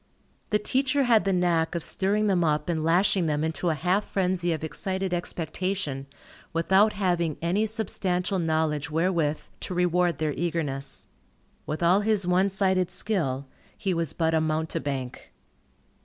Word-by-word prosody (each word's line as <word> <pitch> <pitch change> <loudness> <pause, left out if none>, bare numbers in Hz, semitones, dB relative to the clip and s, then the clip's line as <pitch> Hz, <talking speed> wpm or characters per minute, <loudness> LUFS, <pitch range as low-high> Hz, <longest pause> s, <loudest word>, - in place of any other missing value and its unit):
The 210 - +3
teacher 265 +6 +1
had 230 -5 +4
the 195 - +2
knack 175 -3 +1
of 170 - -1
stirring 205 +3 +1
them 190 -4 +2
up 150 0 0
and 160 -2 0
lashing 175 +2 +3
them 150 0 0
into 160 +2 -1
a 160 - +1
half 180 +7 +1
frenzy 180 -3 0
of 160 -1 -2
excited 190 +3 -3
expectation, 170 -4 -3 0.5
without 190 +6 +4
having 175 -5 0
any 190 +6 +1
substantial 190 -3 -1
knowledge 160 -2 0
wherewith 160 -2 0 0.2
to 185 - -5
reward 180 -1 +2
their 155 -2 -1
eagerness. 150 -5 -3 0.6
With 155 +3 -3
all 180 +4 +5
his 210 -3 +2
one 180 +2 +3
sided 190 -2 +1
skill, 140 -11 -2 0.3
he 195 -3 -1
was 165 -2 -1
but 160 -1 0
a 160 - +3
mountebank. 155 -5 -3
175 Hz, 150 wpm, -26 LUFS, 160-190 Hz, 0.6 s, all